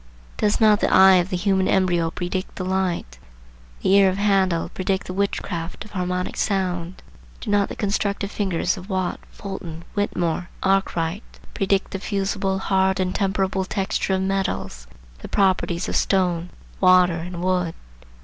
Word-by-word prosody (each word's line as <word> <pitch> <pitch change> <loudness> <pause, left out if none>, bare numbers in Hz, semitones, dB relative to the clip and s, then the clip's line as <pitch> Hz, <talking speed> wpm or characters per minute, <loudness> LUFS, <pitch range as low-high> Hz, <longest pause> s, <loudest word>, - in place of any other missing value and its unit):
Does 210 -1 +1
not 215 -2 +5
the - - +1
eye 190 0 +7
of 175 +1 +1
the 180 - -1
human 190 0 +1
embryo 175 -3 +2
predict 180 +2 -4
the 185 - -4
light? 185 - -2 0.6
the - - +2
ear 200 -1 +6
of 185 - -2
Handel 195 -4 +2
predict 190 +1 -2
the 185 - -6
witchcraft 185 -2 -3
of 215 - -14
harmonic 180 -1 -2
sound? 185 -3 -2 0.4
Do - - -4
not 205 -1 +2
the - - -6
constructive 200 0 -1
fingers 185 -3 -1
of 185 +2 -10
Watt, 185 -2 -1
Fulton, 170 -5 -7
Whittemore, 175 -4 -1
Arkwright, 190 -1 +1 0.3
predict 195 -1 0
the 195 - -4
fusible, 195 -1 -1
hard, 190 0 +1
and 185 0 0
temperable 195 -1 0
texture 190 0 -1
of 190 - -1
metals, 190 - -2 0.3
the - - -8
properties 185 -3 +1
of - - -3
stone, 180 -3 +1 0.3
water, 185 -2 +5
and 175 +1 -6
wood? 180 -2 0
190 Hz, 155 wpm, -23 LUFS, 180-195 Hz, 0.6 s, eye